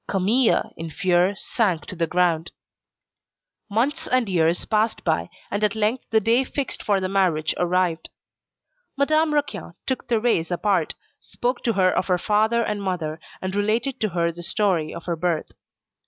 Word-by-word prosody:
Camille 215 +6 +2
in 165 0 -5
fear 180 +3 +2
sank 195 -4 0
to - - -7
the 165 -1 0
ground. 170 -1 +1 1.2
Months 280 +10 0
and 255 -3 +2
years 170 -2 +1
passed 220 +1 0
by, 160 0 0 0.2
and 205 +1 -1
at 210 0 +2
length 220 +4 0
the 220 - +4
day 230 +5 +3
fixed 270 0 -4
for 200 -2 +1
the 185 - -1
marriage 180 -5 +1
arrived. 175 -1 0 0.9
Madame 310 +3 +3
Raquin 295 -1 -2
took 260 - -3
Thérèse 225 -8 +1
apart, 190 +3 0 0.2
spoke 245 +1 -3
to 230 - 0
her 185 -2 +3
of - - 0
her 180 -2 +2
father 220 +5 +2
and 210 -2 -2
mother, 170 -5 -3 0.2
and 185 0 -2
related 220 +6 0
to 215 - +1
her 170 -1 0
the 170 +1 -10
story 180 -3 0
of 170 - -8
her 170 - -1
birth. 165 -1 -1
195 Hz, 165 wpm, -23 LUFS, 175-225 Hz, 1.2 s, the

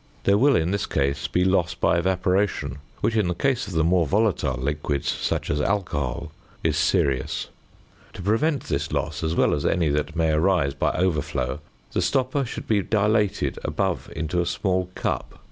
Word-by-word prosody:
There 100 +1 +4
will 140 +2 +5
in 85 0 +1
this 100 -1 -1
case 70 +1 0
be 90 +1 +1
loss 95 -3 +2
by 85 - +2
evaporation, 90 -5 0 0.2
which 115 - +1
in 105 -4 +2
the 90 - -1
case 130 +1 0
of 100 - -6
the 80 -1 +2
more 85 -1 +3
volatile 90 - +1
liquids, 70 +1 -2
such - - -2
as 75 +1 0
alcohol, 80 -5 -1 0.3
is 80 -2 +1
serious. 75 -3 +1 0.6
To 90 - -8
prevent 130 - +1
this 70 0 -2
loss, - - -2
as 80 +1 0
well - - +3
as 70 - -1
any 85 -5 +2
that 75 +3 -1
may 80 -2 +2
arise 80 -3 +2
by 70 - 0
overflow, 75 -7 -1 0.3
the - - 0
stopper 135 +1 +1
should 120 - -6
be 105 -2 +3
dilated 105 0 +1
above - - -2
into 80 +3 -1
a 85 - -2
small 95 -2 0
cup, - - -2
A - - -19
(fig. - - -21
85 Hz, 185 wpm, -24 LUFS, 75-100 Hz, 0.6 s, will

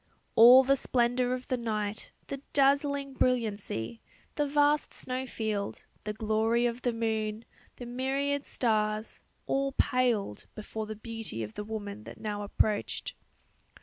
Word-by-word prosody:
All 245 +3 +9
the 275 +1 +4
splendour 245 -1 +1
of 255 0 -3
the 255 - 0
night, 215 -2 -3 0.2
the 275 - -5 0.2
dazzling 280 0 +2
brilliancy, 225 - -1 0.3
the 295 -1 0
vast 290 +1 +2
snow 255 +1 -3
field, 215 -4 -3 0.2
the 210 - -2
glory 220 +2 +1
of 240 +1 -1
the 245 - +1
moon, 220 -1 -2 0.3
the 245 - -8
myriad 270 +3 -1
stars, 215 -2 -1 0.2
all 275 0 0
paled 235 - +1
before 215 0 -5
the 215 - -5
beauty 225 - -5
of 105 0 -7
the 210 - -5
woman 210 0 -6
that - - -10
now 210 -1 -3
approached. 205 0 -1
230 Hz, 140 wpm, -30 LUFS, 215-260 Hz, 0.3 s, All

